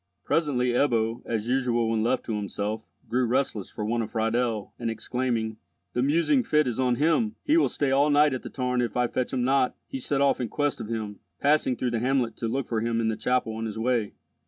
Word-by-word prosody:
Presently 140 -6 +1
Ebbo, 120 -3 +1
as 110 -1 -2
usual 120 -2 +1
when 110 -1 +1
left 120 +3 +1
to 110 - -2
himself, 105 +1 -3 0.3
grew 125 +2 +1
restless 120 -5 -1
for 105 - -5
want 115 +2 0
of 110 - -4
Friedel, 115 -1 -1
and 115 -1 -2
exclaiming, 115 -1 -2 0.4
"The 125 - 0
musing 165 - +3
fit 155 -10 +2
is 125 -1 -2
on 125 -2 +2
him!—he 215 - +1
will 330 - +4
stay 140 -2 0
all 140 +2 +4
night 145 0 +4
at 130 - -3
the - - -7
tarn 125 -1 -1
if 120 -2 -2
I 125 - +3
fetch 125 +1 -2
him 125 -2 0
not," 130 0 +2
he 135 - -6
set 135 +2 -1
off 140 -2 +3
in 120 - -2
quest 145 +3 -1
of - - -5
him, 110 -3 -4 0.2
passing 145 -3 +3
through 125 0 -1
the 115 - 0
hamlet 125 -2 +1
to 115 - -2
look 130 +3 -1
for 115 -2 -1
him 115 0 0
in 115 -1 +1
the 110 - -1
chapel 115 +1 0
on 110 0 -3
his 110 - -6
way. 115 -2 0
125 Hz, 230 wpm, -26 LUFS, 115-135 Hz, 0.4 s, will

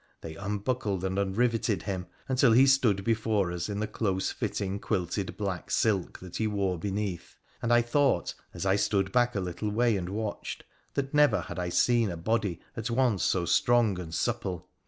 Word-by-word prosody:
They 80 -1 -7
unbuckled 100 0 -2
and 95 +1 -1
unriveted 105 -1 +1
him, 95 -2 -4 0.2
until 130 -2 +4
he 130 +4 +7
stood 125 -8 +3
before 110 -4 +1
us 90 +2 -3
in 100 0 -3
the 110 - 0
close 95 -3 -1
fitting 100 0 -3
quilted 95 -1 -2
black 95 -4 -3
silk 100 -5 +1
that 90 -1 -7
he 110 - 0
wore 100 -4 -1
beneath, 100 -1 -3 0.3
and 115 - 0
I 120 0 +5
thought, 130 -5 +1 0.2
a3 - - -4
I 95 0 +3
stood 95 -1 +1
back 120 -1 +2
a - - +1
little 90 +3 -3
way 115 +1 +2
and 90 -2 -3
watched, 105 +1 -4 0.3
that 135 0 -2
never 145 -10 +4
had 90 - -7
I 90 -1 -2
seen 115 +4 +3
a 85 - -4
body 105 0 -1 0.2
at 115 +1 -3
once 115 -5 +2
so 90 -2 +1
strong 115 0 +3
and 85 -3 -7
supple. 90 +1 -2
100 Hz, 185 wpm, -28 LUFS, 95-115 Hz, 0.3 s, he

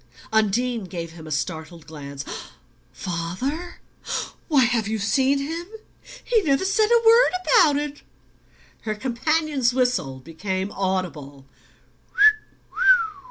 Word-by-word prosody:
Undine 220 +1 +1
gave 170 -2 -6
him 160 -1 -12
a - - -8
startled 160 +2 -4
glance. 140 -2 -8 0.7
"Father? 190 - -4 0.7
Why, 285 -5 +4
have 235 -3 +1
you 220 +1 -1
seen 265 +7 +2
him? 325 +5 -4 0.6
He 465 -3 +2
never 285 0 +1
said 400 +3 +2
a 470 -1 +3
word 460 +2 +6
about 310 -12 +5
it!" 295 0 -4 0.8
Her 215 -1 -3
companion's 265 +2 0
whistle 245 - 0
became 185 +7 -4
audible. 170 -9 -3
225 Hz, 110 wpm, -23 LUFS, -, 0.8 s, word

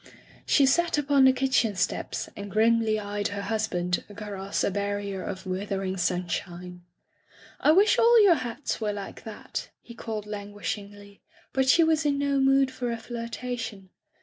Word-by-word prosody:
She 280 - +5
sat 335 +5 +2
upon 280 -2 +4
the 260 - +8
kitchen 255 -5 +1
steps 180 - -2
and 200 0 -7
grimly 220 +1 +3
eyed 205 0 -2
her 200 0 -5
husband 195 -4 -1
across 200 -2 -4
a - - +1
barrier 200 -1 -3
of 190 0 -6
withering 190 0 -3
sunshine. 180 0 -3 0.8
"I - - +4
wish 400 +5 +4
all 465 -1 +6
your 390 -4 +7
hats 255 -3 -4
were 210 -1 -1
like 200 -1 -8
that,'* 220 -2 -6
he 235 - -13
called 220 -2 -5
languishingly, 205 -1 -7 0.3
but 265 0 +2
she 335 - +6
was 320 -1 +2
in 290 -1 +1
no 280 -1 +1
mood 270 0 +4
for 245 -2 -3
a 230 - -2
flirtation. 230 -3 -6
215 Hz, 155 wpm, -27 LUFS, 200-265 Hz, 0.8 s, the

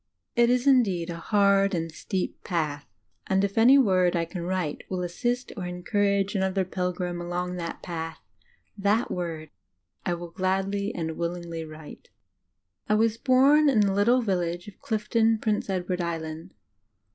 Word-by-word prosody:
It 235 0 +4
is 250 +1 +2
indeed 195 -11 +3
a 170 - -5
"hard 200 +1 +3
and 165 -1 -3
steep" 185 +3 -4
path; 155 -5 -2 0.4
and 190 +1 +2
if 200 0 -1
any 245 +5 +7
word 185 -8 +3
I 170 -1 +1
can 175 +1 -6
write 175 -3 -2
wilt 180 -1 -2
assist 240 +8 -2
or 185 -5 -4
encourage 200 +2 0
another 190 -1 0
pilgrim 180 -1 -3
along 180 +1 -3
that 170 -1 -5
path, 165 -2 -5 0.6
that 205 +3 +1
word 165 -3 -4 0.5
I 175 - 0 0.2
gladly 195 +2 -1
and 160 -1 -3
willingly 170 -1 -4
write. 155 -1 -12 0.8
I 210 - +4
was 225 +1 +2
bom 275 +4 +5
in 230 -6 +4
the 200 -1 +2
little 235 +6 +3
village 175 -3 -1
of 210 - -12
Clifton, 225 +1 +1
Prince 215 -2 -1
Edward 180 -1 -1
Island. 165 0 -5
185 Hz, 150 wpm, -26 LUFS, 175-210 Hz, 0.8 s, any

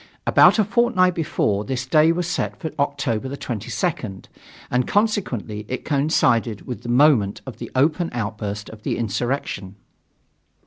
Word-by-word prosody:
About - - +6
a 215 - +4
fortnight 210 -4 +2
before, 110 -11 0
this 130 +1 -3
day 155 +4 +4
was 175 +1 -1
set 175 - -2
for 160 - -4
October 135 -4 -1
22nd, 120 - -3 0.5
and 125 0 +1
consequently 160 - -1
it 130 - -4
coincided 130 -7 +1
with 125 - -6
the 120 - -7
moment 120 -6 +4
of 130 - -8
the - - -7
open 155 +6 +2
outburst 105 -2 -4
of 110 -1 -12
the - - -2
insurrection. 110 -3 -3
130 Hz, 140 wpm, -22 LUFS, 110-160 Hz, 0.5 s, About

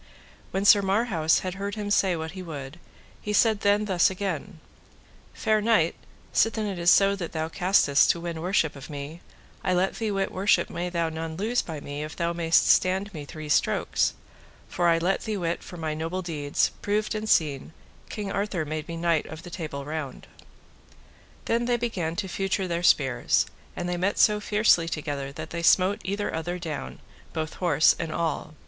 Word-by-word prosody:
When 195 +1 -2
Sir 205 0 +7
Marhaus 195 -5 +2
had 185 -1 -4
heard 200 +2 -4
him 205 -1 -4
say 190 -3 +3
what 160 0 -5
he 190 - -8
would, 150 -2 -8 0.4
he 210 - -3
said 220 -1 +4
then 205 +1 +3
thus 185 -4 +3
again: 190 -2 -4 0.7
Fair 215 -1 +1
knight, 210 -7 +3 0.4
sithen 225 -1 +2
it 195 -4 -4
is 170 0 +3
so 195 +2 +5
that 175 -4 -6
thou 160 0 -2
castest 180 -5 +3
to 170 - +2
win 170 -1 -5
worship 175 -4 +1
of 140 +1 -10
me, 145 +3 -7 0.4
I 185 -1 +1
let 185 +2 0
thee 220 -2 -1
wit 195 -1 -1
worship 195 +3 +2
may 175 +1 -3
thou 170 -2 -1
none 160 0 -5
lose 225 +5 +1
by 160 -3 -6
me 145 +1 -6
if 155 0 -7
thou 170 -1 -1
mayest 165 -1 +3
stand 190 +2 +2
me 150 -3 -7
three 155 +1 -8
strokes; 150 - +1 0.5
for 175 -1 0
I 165 -1 +4
let 180 +4 0
thee 215 -1 -2
wit 170 -2 -2
for 180 - -10
my 160 -2 -3
noble 165 +4 -3
deeds, 150 -4 0
proved 210 +1 0
and 215 0 -3
seen, 145 -2 +1 0.4
King 205 -2 -4
Arthur 195 -5 -2
made 155 0 -4
me 170 - -5
Knight 165 -2 +1
of 160 +1 -9
the 175 - -10
Table 150 -5 -5
Round. 150 -3 -5 1.2
Then 235 +1 +1
they 240 0 +1
began 185 -9 -2
to 195 +1 -3
feutre 195 +1 -1
their 170 -1 -2
spears, 135 -7 +3 0.3
and 175 - -3
they 175 0 -1
met 190 +3 0
so 210 -1 +4
fiercely 205 -5 +3
together 145 -3 -4
that 155 +2 -8
they 170 - -3
smote 185 +4 +4
either 200 +2 -2
other 175 +2 -3
down, 165 -4 -6 0.4
both 155 -1 -3
horse 155 -4 +4
and 165 -1 -3
all. 160 -1 -2
175 Hz, 190 wpm, -26 LUFS, 160-200 Hz, 1.2 s, Sir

